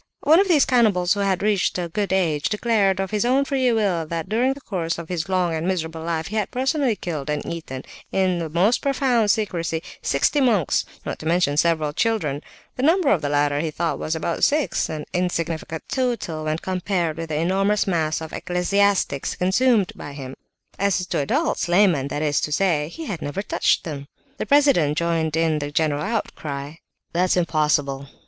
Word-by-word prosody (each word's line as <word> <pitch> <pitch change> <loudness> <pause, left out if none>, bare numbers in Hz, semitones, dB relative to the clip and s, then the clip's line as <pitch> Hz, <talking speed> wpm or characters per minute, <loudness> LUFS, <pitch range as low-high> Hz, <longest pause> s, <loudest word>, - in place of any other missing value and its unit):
One 320 +3 +5
of 395 - +3
these 310 -7 +4
cannibals, 210 -8 +3
who 205 - -4
had 195 -2 0
reached 205 -3 +1
a 175 -1 -2
good 200 +4 -2
age, 165 -6 +1
declared 210 -3 +1
of 195 +1 -2
his 210 0 +1
own 260 +3 +2
free 260 -3 +1
will 200 -7 +1
that 165 0 -4
during 245 +5 +1
the 280 - -13
course 170 -8 -3
of 170 -1 -8
his 175 0 -3
long 180 -3 +1
and 160 +2 -2
miserable 165 -3 -2
life 160 -1 -2
he 215 - -3
had 210 -2 0
personally 265 -1 0
killed 155 -7 -5
and 150 -1 -2
eaten, 155 -6 -6 0.3
in 185 -2 +1
the 165 -2 -3
most 185 +9 +2
profound 255 -6 +1
secrecy, 170 -6 -1 0.2
sixty 210 - +1
monks, 215 - +2 0.2
not - - -4
to 155 - -6
mention 170 -4 +2
several 155 -1 +1
children; 160 - 0 0.4
the - - -2
number 325 +2 +3
of 175 - +2
the 145 - -2
latter 145 0 +1
he 160 +1 -1
thought 165 +2 -2
was 155 - -2
about 165 +1 -2
six, 300 -1 +2
an 155 -1 -5
insignificant 165 -3 -2
total 230 - -2
when 155 0 0
compared 180 -2 -2
with 165 -1 -5
the 155 - -2
enormous 195 +6 +1
mass 160 -4 0
of 160 - -7
ecclesiastics 185 -4 0
consumed 200 +2 +2
by 145 - -8
him. 135 -2 -7 0.5
As 195 -2 +1
to - - -2
adults, 265 - 0
laymen 175 -7 +3
that 145 +2 -3
is 145 -2 +1
to 150 - -2
say, 155 -3 +1
he 320 - -8
had 180 - -5
never 165 +8 -3
touched - - +1
them." 140 -4 -6 0.3
The - - -4
president 275 - +4
joined 165 -2 0
in 160 -2 +1
the 145 0 -4
general 150 -1 0
outcry. 150 -7 -4 0.4
"That's 180 +1 +2
impossible!" 150 -5 0
175 Hz, 190 wpm, -22 LUFS, 155-210 Hz, 0.5 s, One